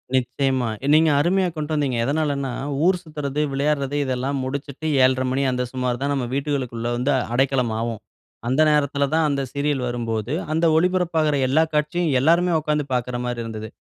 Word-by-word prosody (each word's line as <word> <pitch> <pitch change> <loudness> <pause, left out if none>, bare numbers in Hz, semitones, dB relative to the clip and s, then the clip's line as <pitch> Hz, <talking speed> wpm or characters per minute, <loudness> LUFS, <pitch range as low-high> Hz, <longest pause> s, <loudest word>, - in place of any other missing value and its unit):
நிச்சயமா. 130 -1 0 0.2
நீங்க 160 +1 +5
அருமையா 185 +5 +2
கொண்ட்டு 155 0 -3
வந்தீங்க. 140 -5 0
எதனாலன்னா, 140 -1 -1 0.3
ஊர் 180 0 +3
சுத்துறது, 150 -3 -3
விளையாட்றது 140 0 0
இதெல்லாம் 130 +2 -2
முடிச்சுட்டு 140 +3 -5 0.2
7:30 130 0 +3
மணி 135 +1 0
அந்த 125 0 -1
சுமார் 125 -2 -1
தான் 140 +1 0
நம்ம 135 -3 -1
வீட்டுகளுக்குள்ள 130 -5 -2
வந்து 125 +4 0 0.2
அடைக்கலம் 130 -2 +1
ஆவோம். 115 -1 -3 0.5
அந்த 130 +5 +2
நேரத்தில 140 -1 +1
தான் 160 0 +3
அந்த 140 -1 0
சீரியல் 145 -1 0
வரும்போது 115 0 -3 0.2
அந்த 160 +2 +1
ஒளிபரப்பாகுற 165 -3 +2
எல்லா 150 +5 +3
காட்சியும் 150 +3 0
எல்லாருமே 170 +6 +3
உட்கார்ந்து 150 -1 -1
பார்க்கறமாரி 125 0 -2
இருந்தது. 110 -1 -6
140 Hz, 150 wpm, -22 LUFS, 125-150 Hz, 0.5 s, நீங்க